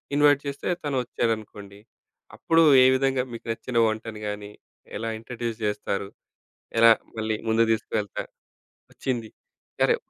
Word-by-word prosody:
Invite 145 -1 +5
చేస్తే 140 0 -4 0.2
తను 145 -2 -2
వచ్చాడనుకోండి, 105 -4 -3 0.6
అప్పుడు 165 0 +3 0.2
ఏ - - +6
విధంగా 135 -1 +1
మీకు 115 - -8
నచ్చిన 120 +1 -4
వంటను 110 0 -4
గాని, 105 0 -5 0.5
ఎలా 115 +1 -3
ఇంట్రొడ్యూస్ 115 -1 -5
జేస్తారు? 100 -1 -2 0.7
ఎలా 115 0 +8 0.3
మళ్ళీ 110 0 -1
ముందుకు 115 0 +3
దిసుకువేళతా 105 -2 -2 0.7
వచ్చింది. 120 -4 -3 0.5
సరే - - +4
115 Hz, 120 wpm, -25 LUFS, 105-130 Hz, 0.7 s, ఎలా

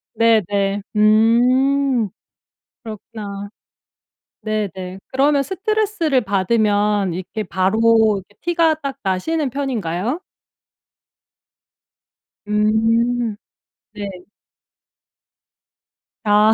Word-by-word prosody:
네네. 205 -3 +2 0.2
음. 240 +3 +3 0.7
그렇구나. 210 -2 -8 0.9
네네. 195 -3 -4
그러면 280 +1 +2
스트레스를 385 - 0
받으면 205 -1 +1
이렇게 190 +4 -5
바로 215 +2 +2
이렇게 205 - -27
티가 335 -2 +2
딱 275 -3 -6
나시는 265 - -1
편인가요? 245 - -2 2.3
음. 225 +2 +1 0.6
네. 205 -1 -5 2.1
아. 210 +1 +4
220 Hz, 150 characters per minute, -19 LUFS, 205-265 Hz, 2.3 s, 아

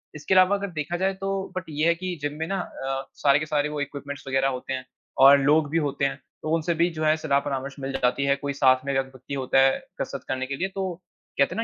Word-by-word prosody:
इसके 150 +4 -1
अलावा, 185 +1 +6
अगर 200 0 -3
देखा 155 +3 -2
जाए, 190 +2 +1
तो 195 0 -3
बट 185 - -2
ये 155 +1 0
है 170 - +4
कि 180 +1 -4
जिम 145 0 -2
में 160 - -2
ना 195 +1 -1
अ, 135 -5 -4
सारे 140 0 +4
के 155 - -3
सारे 150 -1 0
वो 150 -1 -3
इक्विपमेंट्स 140 0 -6
वग़ैरह 135 0 +2
होते 135 0 -3
हैं 130 -1 -4 0.4
और 140 +1 +9
लोग 145 +2 +3
भी 165 - 0
होते 140 0 -1
हैं, 135 0 0 0.3
तो 155 - -3
उनसे 165 +1 0
भी 170 +1 +4
जो - - -1
है, 155 0 +4
सलाह-परामर्श 140 -2 -1
मिल 135 0 -4
जाती 125 +3 +2
है। 140 0 +3
कोई 140 0 -4
साथ 130 -1 +3
में 140 - -1
व्यक्ति 135 0 -4
होता 135 -1 +2
है, 135 - +2 0.2
कसरत - - -4
करने 130 0 -2
के 140 - -3
लिए, 185 - 0
तो 190 -2 -2 0.4
कहते 140 - +2
हैं 225 - 0
145 Hz, 255 wpm, -25 LUFS, 135-170 Hz, 0.4 s, और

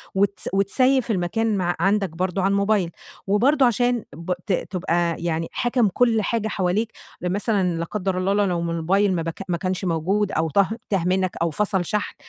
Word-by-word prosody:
وت 200 +1 +1
وتسَيِّف 255 +6 +2
المكان 210 +3 0
م 175 -2 0
عندك 195 +2 +2
برضه 180 +3 -2
على 195 +1 +2
الموبايل، 200 -3 +1 0.4
وبرضه 255 +8 +4
عشان 245 0 +1
ب 170 +3 -3
ت 195 - +2 0.2
تبقى 170 -2 0
يعني 165 -1 -1
حاكم 240 -2 +1
كلّ 225 +3 +2
حاجة 220 +1 -1
حواليك، 210 +2 0 0.3
لو 180 - -1
مثلًا 190 -2 0
لا 165 - -2
قدر 190 0 -2
الله 185 +2 +1
ل 205 0 +2
لو 175 -1 0
الموبايل 170 +4 +1
ما 170 - -1
بك 165 +3 -5
ما 175 - 0
كانش 185 +2 -2
موجود 185 +5 0
أو 160 0 0
طه 195 +5 +3 0.2
تاه 195 -4 +1
منك 185 0 +1
أو 170 - +2
فصل 190 +1 0
شحن، 210 +5 -2
195 Hz, 185 wpm, -23 LUFS, 175-210 Hz, 0.4 s, وبرضه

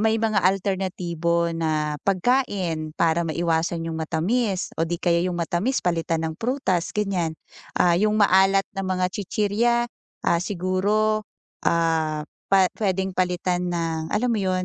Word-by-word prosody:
may 220 0 +3
mga 225 -1 +1
alternatibo 180 -3 0
na 155 -2 -1
pagkain 190 -7 0
para 165 0 +2
maiwasan 165 +1 -1
'yung 165 - -4
matamis 190 +6 -1
o - - +3
di 175 - -1
kaya 170 -1 +2
'yung 180 -1 -2
matamis 175 +9 0
palitan 165 -2 0
ng 160 0 -3
prutas, 225 -8 0
ganiyan. 195 -6 -1 0.4
Ah, 175 -1 +4
'yung 210 +3 +2
maalat 195 -1 +4
na 195 - -4
mga 185 -1 0
chichirya, 215 +5 +1 0.4
ah, 170 - +2
siguro, 205 +4 0 0.4
ah, 160 -2 +1 0.3
pa 195 -1 +6
puwedeng 190 -2 -1
palitan 180 0 0
ng, 165 -1 -2
alam 225 +4 +1
mo 225 - 0
'yun, 185 -1 0
185 Hz, 140 wpm, -24 LUFS, 170-205 Hz, 0.4 s, pa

